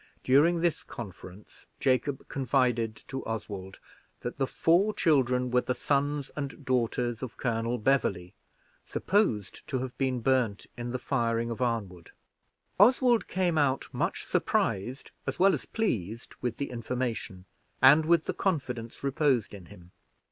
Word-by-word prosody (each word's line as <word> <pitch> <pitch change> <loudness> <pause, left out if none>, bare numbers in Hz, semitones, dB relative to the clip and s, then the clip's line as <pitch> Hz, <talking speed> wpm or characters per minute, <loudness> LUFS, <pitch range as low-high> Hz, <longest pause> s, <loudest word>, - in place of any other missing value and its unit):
During 160 +6 +4
this 170 -2 +1
conference, 95 -2 -10
Jacob 130 +1 0
confided 125 -4 +1
to 135 0 -5
Oswald 100 -4 -5 0.4
that 120 - -5
the 135 - +1
four 185 +10 +2
children 125 -5 +2
were 125 0 +4
the 125 - -2
sons 145 0 0
and 140 0 -5
daughters 120 -2 0
of 130 -3 -6
Colonel 115 0 -1
Beverley, 105 -7 0 0.5
supposed 190 - 0
to 130 - -1
have 130 0 -4
been 130 -2 0
burned 120 -5 +1
in 120 0 -5
the 125 - -2
firing 115 -3 0
of 115 - -5
Arnwood. 100 -8 -2 0.7
Oswald 240 0 +5
came 180 -4 +1
out, 135 -2 +1
much - - -2
surprised 120 +8 -1 0.2
as - - -2
well 195 +1 +5
as - - -3
pleased 115 - -2
with 125 -2 -2
the 140 - -3
information, 115 -5 -4 0.3
and 140 +5 +7
with 170 -1 +4
the - - -2
confidence 125 - -2
reposed 135 -5 +1
in 95 -4 -10
him. 90 +1 -15
125 Hz, 140 wpm, -29 LUFS, 115-145 Hz, 0.7 s, and